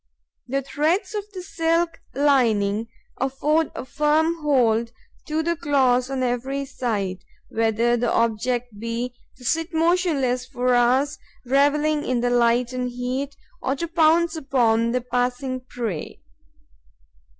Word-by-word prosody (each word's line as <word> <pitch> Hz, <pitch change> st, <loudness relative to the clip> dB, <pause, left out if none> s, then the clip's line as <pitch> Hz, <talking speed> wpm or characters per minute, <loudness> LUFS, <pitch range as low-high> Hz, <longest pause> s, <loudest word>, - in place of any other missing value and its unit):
The 275 Hz, +2 st, -1 dB
threads 330 Hz, +9 st, 0 dB
of 415 Hz, -1 st, -3 dB
the 370 Hz, -3 st, -7 dB
silk 335 Hz, -2 st, 0 dB, 0.2 s
lining 230 Hz, -7 st, +2 dB, 0.3 s
afford 290 Hz, +4 st, 0 dB
a -, -, -5 dB
firm 305 Hz, +5 st, +1 dB
hold 235 Hz, -6 st, +2 dB, 0.4 s
to 310 Hz, +1 st, 0 dB
the 340 Hz, +1 st, 0 dB
claws 260 Hz, -5 st, +2 dB
on 265 Hz, -1 st, -2 dB
every 260 Hz, +3 st, -1 dB
side, 210 Hz, -8 st, -2 dB, 0.3 s
whether 225 Hz, +1 st, +1 dB
the 240 Hz, 0 st, 0 dB
object 230 Hz, 0 st, 0 dB
be 230 Hz, +2 st, -3 dB, 0.2 s
to 250 Hz, -, -14 dB
sit 325 Hz, +5 st, -1 dB
motionless 320 Hz, -7 st, +2 dB
for 250 Hz, -1 st, 0 dB
hours, 255 Hz, +4 st, +2 dB, 0.3 s
revelling 295 Hz, +3 st, +2 dB
in 250 Hz, -2 st, 0 dB
the 245 Hz, 0 st, +1 dB
light 240 Hz, +1 st, +2 dB
and 250 Hz, 0 st, -2 dB
heat, 255 Hz, +3 st, -3 dB, 0.3 s
or 270 Hz, -, 0 dB
to 335 Hz, +5 st, -3 dB
pounce 330 Hz, 0 st, +3 dB
upon 240 Hz, -6 st, +2 dB
the 250 Hz, +1 st, 0 dB
passing 250 Hz, +2 st, -1 dB
prey. 235 Hz, -9 st, -5 dB
255 Hz, 130 wpm, -23 LUFS, 240-300 Hz, 0.4 s, pounce